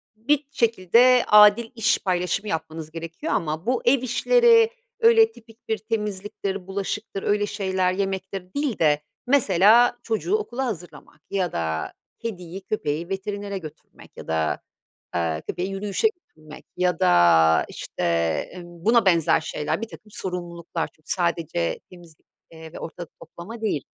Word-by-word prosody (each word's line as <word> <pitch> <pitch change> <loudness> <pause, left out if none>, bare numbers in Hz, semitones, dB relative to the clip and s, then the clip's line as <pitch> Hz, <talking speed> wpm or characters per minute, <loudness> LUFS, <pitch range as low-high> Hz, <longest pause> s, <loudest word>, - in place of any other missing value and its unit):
bir 285 +7 0
şekilde 235 +1 +4
adil 210 +2 +6
iş 225 0 +2
paylaşımı 180 +2 -1
yapmanız 160 -1 -5
gerekiyor 165 - -5
ama 160 -1 -2
bu 250 +2 0
ev 255 +1 +4
işleri 460 - +4 0.3
öyle 455 -1 +6
tipik 225 - -19
bir 220 - +1
temizliktir, 205 -3 -4
bulaşıktır, 195 +1 -4
öyle 205 0 +1
şeyler 190 -3 -1
yemektir 190 -1 -4
değil 285 -6 -2
de 150 -2 +3 0.3
mesela 235 -1 +5
çocuğu 235 - 0
okula 265 - -2
hazırlamak 180 -8 -8
ya 185 -4 -1
da 80 -1 -3 0.3
kediyi, 190 -4 -6
köpeği 170 -4 -3
veterinere 200 +1 -4
götürmek 155 -5 -13
ya - - -10
da, 80 -1 -1 0.5
aaa, 80 -2 -1
köpeği 180 - -4
yürüyüşe 200 - 0
götürmek 155 - -12
ya 180 -2 +1
da, 80 -2 +5
işte, - - -6 0.5
ımm, 175 -1 -12
buna 230 -1 +4
benzer 170 -5 +3
şeyler, 150 +3 -3
birtakım 220 -1 -9
sorumluluklar 175 -3 -4
çünkü 155 - -25
sadece 170 - -1
temizlik 170 -3 -16 0.3
ve 160 0 -10
ortalık 165 0 -8
toplama 185 +8 -10
değil. 205 -11 -1
190 Hz, 135 wpm, -24 LUFS, 165-225 Hz, 0.5 s, adil